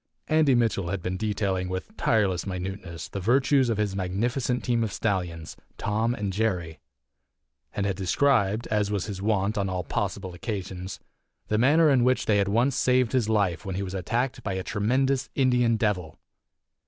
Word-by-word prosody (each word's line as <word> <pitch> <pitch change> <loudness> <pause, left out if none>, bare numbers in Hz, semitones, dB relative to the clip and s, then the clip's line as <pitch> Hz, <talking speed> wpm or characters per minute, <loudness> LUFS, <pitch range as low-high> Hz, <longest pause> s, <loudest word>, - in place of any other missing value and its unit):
Andy 155 -4 +4
Mitchell 115 -6 +1
had 95 -2 -3
been 90 0 -2
detailing 100 -3 -1
with 95 - -5
tireless 100 - +1
minuteness 90 -2 -5
the 100 - -5
virtues 130 +5 +3
of 115 - 0
his 105 -2 -1
magnificent 120 +7 -1
team 120 -2 +1
of 110 - -2
stallions, 90 -7 -2 0.2
Tom 110 +3 0
and 100 -4 -3
Jerry, 90 -7 -1 1.0
and 100 - -1
had 100 -2 -1
described 110 +1 +2
(as 105 -1 +1
was 100 -3 -1
his 100 -3 -6
wont 105 0 +1
on 100 -1 0
all 90 -1 -2
possible 95 +4 -3
occasions) 95 -1 -5 0.5
the 105 - +2
manner 150 +5 +5
in 130 -3 +4
which 130 +1 +2
they 105 - +3
had 100 -1 +2
once 120 +6 +2
saved 125 -2 +2
his 120 -4 +1
life 100 -6 +1
when 95 -1 -4
he 100 - -2
was 95 -1 -5
attacked 115 +8 -1
by 100 - -3
a 95 0 -3
tremendous 130 +5 0
Indian 125 -3 +3
Devil. 95 -7 -1
105 Hz, 175 wpm, -26 LUFS, 95-120 Hz, 1.0 s, manner